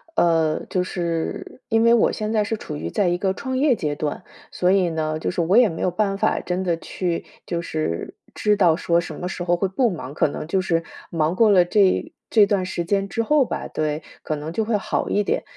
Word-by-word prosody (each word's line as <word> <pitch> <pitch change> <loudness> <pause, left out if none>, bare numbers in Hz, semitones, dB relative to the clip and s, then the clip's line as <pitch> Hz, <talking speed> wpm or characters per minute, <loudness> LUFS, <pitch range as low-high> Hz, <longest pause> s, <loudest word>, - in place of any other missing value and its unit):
呃， 165 - +2
就 185 - 0
是， 170 +6 -4
因 225 -1 +2
为 230 0 +6
我 235 - +4
现 215 0 -3
在 215 -2 +2
是 225 - -1
处 - - -7
于 80 +2 -4
在 180 - +1
一 175 - +1
个 190 0 0
创 260 +5 -4
业 275 -1 +3
阶 150 -7 -2
段。 150 +4 -4 0.3
所 180 0 +1
以 190 -3 +3
呢， 155 -1 -2
就 - - -2
是 180 -1 -1
我 180 +6 +3
也 245 -2 +7
没 165 - -5
有 180 - +1
办 195 +1 0
法 - - +1
真 180 +1 -2
的 175 -3 0
去， 170 +1 -3 0.2
就 170 -1 -2
是 155 - -3 0.2
知 210 0 +2
道 175 -5 +4
说 170 -1 +2
什 160 -3 -8
么 180 - -3
时 180 -1 -4
候 175 0 +1
会 195 +2 0
不 235 +6 +1
忙， 155 -7 -6
可 150 - +2
能 155 - -6
就 185 +3 +1
是 165 -2 0 0.3
忙 165 +1 0
过 225 0 +5
了 180 -3 +6
这 190 +1 +2 0.2
这 215 -3 +6
段 200 -2 0
时 175 -2 -3
间 195 +1 0
之 230 - -1
后 285 +4 +3
吧， - - -4
对， 155 0 -2 0.2
可 155 - -2
能 155 +2 -6
就 220 - 0
会 215 0 +1
好 200 - -2
一 205 - +2
点。 205 - -1
180 Hz, 260 characters per minute, -22 LUFS, 165-205 Hz, 0.3 s, 也